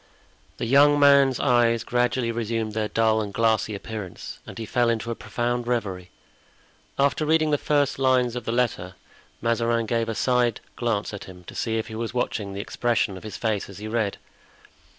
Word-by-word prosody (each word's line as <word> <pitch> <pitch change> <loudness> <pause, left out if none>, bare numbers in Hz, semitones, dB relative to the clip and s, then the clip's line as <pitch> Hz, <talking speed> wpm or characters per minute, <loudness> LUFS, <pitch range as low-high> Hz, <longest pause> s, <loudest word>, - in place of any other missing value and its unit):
The - - -3
young 145 +4 +5
man's 140 -2 +5
eyes 120 -3 +3
gradually 120 0 0
resumed 115 -1 -2
their 110 0 -1
dull 110 0 +2
and 105 -2 -4
glassy 110 0 +1
appearance 100 -3 -7
and - - -9
he 115 - -4
fell 120 +2 +1
into 115 0 -1
a - - -3
profound 120 +1 -2
reverie. 95 -7 -2 0.9
After 140 +2 +2
reading 155 0 +2
the 145 - +2
first 145 -2 +1
lines 130 -2 +2
of 120 -2 -5
the - - -1
letter 110 -7 -1 0.5
Mazarin 115 0 +1
gave 115 0 -1
a 115 - -2
side 120 -2 +1 0.2
glance 115 -4 -1
at 105 - -7
him 90 -1 -12
to - - -11
see 115 -1 -1
if 110 - -2
he 110 - -9
was 115 +2 -4
watching 105 -5 -2
the 100 - -3
expression 115 -2 0
of 95 - -9
his 110 - -7
face 110 -4 -1
as 100 - -10
he 105 +1 -6
read. 110 -3 -1
115 Hz, 190 wpm, -25 LUFS, 110-125 Hz, 0.9 s, young